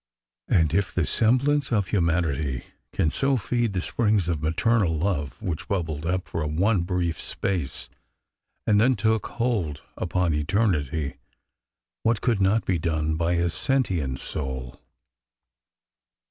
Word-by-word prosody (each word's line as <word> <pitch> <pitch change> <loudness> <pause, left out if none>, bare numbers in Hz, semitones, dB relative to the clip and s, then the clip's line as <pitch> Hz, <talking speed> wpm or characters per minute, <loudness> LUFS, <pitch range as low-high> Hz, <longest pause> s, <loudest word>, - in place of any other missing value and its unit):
'' - - -66
And 80 -3 +3
if 100 +2 +1
the 85 - 0
semblance 135 - +2
of 100 -5 +1
humanity 80 - 0 0.3
can 80 - +1
so 135 - +2
feed 120 -1 -1
the 90 - 0
springs 105 -3 +1
of 85 -4 -1
maternal 90 +2 +2
love 75 -5 -2
which 85 -4 -3
bubbled 80 -5 -2
up 90 +1 -1
for 80 - -3
one 90 +6 +2
brief 85 -2 -1
space 90 -9 -2 0.8
and 105 0 +4
thus 130 +3 +4
took 110 +2 +1
hold 100 -12 -2
upon 90 -1 0
eternity, 75 - 0 0.8
what 115 -1 +1
could 115 -5 +1
not 100 +4 +2
be 90 -3 +1
done 80 -1 0
by 85 +2 +1
a 85 0 +2
sentient 90 - 0
soul? 65 -3 -5
90 Hz, 135 wpm, -25 LUFS, 80-110 Hz, 0.8 s, and